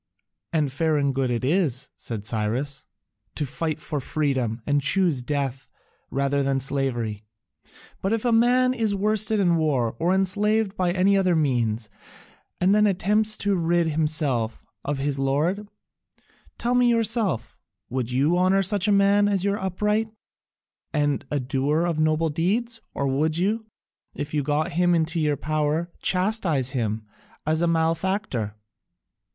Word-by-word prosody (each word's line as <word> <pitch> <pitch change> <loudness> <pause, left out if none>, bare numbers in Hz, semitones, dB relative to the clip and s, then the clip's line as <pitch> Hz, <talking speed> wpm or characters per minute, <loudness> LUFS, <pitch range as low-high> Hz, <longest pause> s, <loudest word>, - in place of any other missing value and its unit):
"And 155 -5 +1
fair 155 +2 +1
and 140 -1 +1
good 130 -1 0
it 120 +1 -1
is," 145 -5 0
said 110 -3 -6
Cyrus, 125 +7 -2 0.5
"to 150 - -1
fight 155 +2 -3
for 150 -1 -4
freedom 130 -6 -1
and 145 0 +2
choose 160 -1 +2
death 135 -2 -3 0.4
rather 140 +1 0
than 135 -1 +1
slavery, 120 -6 -2 0.8
but 195 - -1
if 225 +1 -1
a 240 - +3
man 250 +2 +4
is 220 -4 0
worsted 215 +1 +1
in 175 -3 +3
war 135 -8 0
or 175 +2 +2
enslaved 205 +2 +1
by 180 -3 +1
any 190 +2 +3
other 185 -3 +3
means 120 -7 0 0.7
and 185 +2 +3
then 210 0 +4
attempts 210 +3 +1
to 200 0 0
rid 170 -1 +1
himself 150 -7 0 0.2
of 145 0 -2
his 140 0 -2
lord, 155 +10 0 0.9
tell 240 +1 0
me 250 -1 +4
yourself, 225 - 0 0.3
would 125 -2 -3
you 145 +8 +2
honour 190 +2 +3
such 200 +1 +1
a - - +3
man 200 +1 +4
as 195 -2 0
upright, 210 +2 0 0.9
and 145 -2 0
a 145 - 0
doer 140 +5 0
of 170 -3 -1
noble 155 +1 +2
deeds, 225 +9 -1
or 140 - -1
would 155 +4 +1
you, 215 +5 0 0.5
if 145 +1 -5
you 150 - +1
got 150 +5 0
him 175 +1 +2
in 160 -1 +2
your 155 -4 0
power, 155 +3 -1
chastise 180 - +1
him 110 -4 -2 0.4
as 155 +1 +1
a 170 - +2
malefactor?" 165 - 0
160 Hz, 150 wpm, -24 LUFS, 135-195 Hz, 0.9 s, man